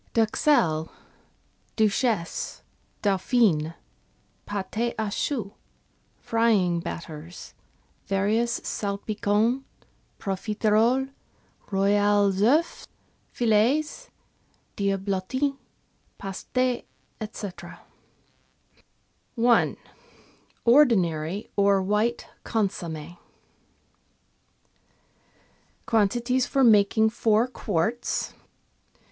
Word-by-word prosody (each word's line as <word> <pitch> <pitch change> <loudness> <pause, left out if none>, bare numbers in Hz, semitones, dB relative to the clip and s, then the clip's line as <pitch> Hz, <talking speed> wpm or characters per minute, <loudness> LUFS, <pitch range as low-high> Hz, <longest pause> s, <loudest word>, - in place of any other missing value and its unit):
("Duxelle," 220 - +2 0.4
" - - -41
Duchesse," 215 -3 0 0.2
" - - -40
Dauphine," 190 -5 +2 0.7
Pate 210 +4 -2
a 215 -2 -2
choux, 215 -5 -2 0.6
frying 210 -7 +2
batters, 165 0 -8 0.5
various 220 +5 +1
Salpicons, 210 +4 -1 0.6
Profiteroles, 220 +6 +1 0.6
Royales 200 0 +2
CEufs 295 +10 +2 0.4
fil6s, 245 - +1 0.7
Diablotins, 200 +8 -1 0.6
Pastes, 195 -1 -7
&c.). 240 -4 -3 1.9
I— 240 -1 +4 0.9
ORDINARY 200 - +3
OR 200 -1 +4
WHITE 210 +5 0 0.2
CONSOMME 175 -6 -3 2.7
Quantities 240 +4 +1
for 270 - +2
making 220 -1 +5
Four 225 0 +2
Quarts. 225 -1 -2
210 Hz, 60 wpm, -25 LUFS, 195-235 Hz, 2.7 s, making